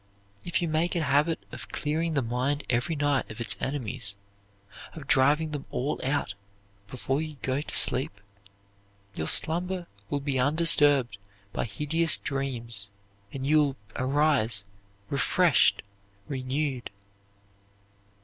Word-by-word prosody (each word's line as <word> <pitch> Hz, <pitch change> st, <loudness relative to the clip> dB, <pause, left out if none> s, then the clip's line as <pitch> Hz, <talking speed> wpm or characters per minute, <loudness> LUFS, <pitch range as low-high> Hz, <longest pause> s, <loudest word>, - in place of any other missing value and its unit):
If 175 Hz, +1 st, -2 dB
you -, -, 0 dB
make 160 Hz, +3 st, -1 dB
a 170 Hz, -, 0 dB
habit 145 Hz, +3 st, +1 dB
of -, -, -9 dB
clearing 160 Hz, +2 st, -2 dB
the 140 Hz, -, +1 dB
mind 130 Hz, +5 st, -2 dB
every 125 Hz, +7 st, -1 dB
night 145 Hz, -2 st, 0 dB
of 110 Hz, -, -9 dB
its 105 Hz, -5 st, +2 dB
enemies, 125 Hz, -6 st, -3 dB, 0.8 s
of 155 Hz, -3 st, -10 dB
driving 145 Hz, +4 st, +3 dB
them 145 Hz, -2 st, -6 dB
all 140 Hz, +4 st, -3 dB
out 135 Hz, -6 st, -1 dB, 0.5 s
before 135 Hz, +5 st, -2 dB
you 155 Hz, -2 st, -7 dB
go 130 Hz, +2 st, -1 dB
to -, -, -3 dB
sleep, 125 Hz, -5 st, +3 dB, 0.9 s
your 80 Hz, -4 st, -4 dB
slumber 180 Hz, +2 st, +4 dB, 0.2 s
will 145 Hz, -, -1 dB
be 140 Hz, -2 st, -2 dB
undisturbed 145 Hz, -5 st, +5 dB, 0.3 s
by -, -, -2 dB
hideous 150 Hz, +9 st, +2 dB
dreams 120 Hz, -7 st, -2 dB, 0.4 s
and 135 Hz, -1 st, -6 dB
you 155 Hz, +2 st, +4 dB
will 140 Hz, -3 st, +1 dB, 0.3 s
rise 130 Hz, -8 st, +1 dB, 0.5 s
refreshed, 165 Hz, +2 st, +2 dB, 0.4 s
renewed. 135 Hz, -1 st, -3 dB
140 Hz, 125 wpm, -27 LUFS, 125-155 Hz, 0.9 s, undisturbed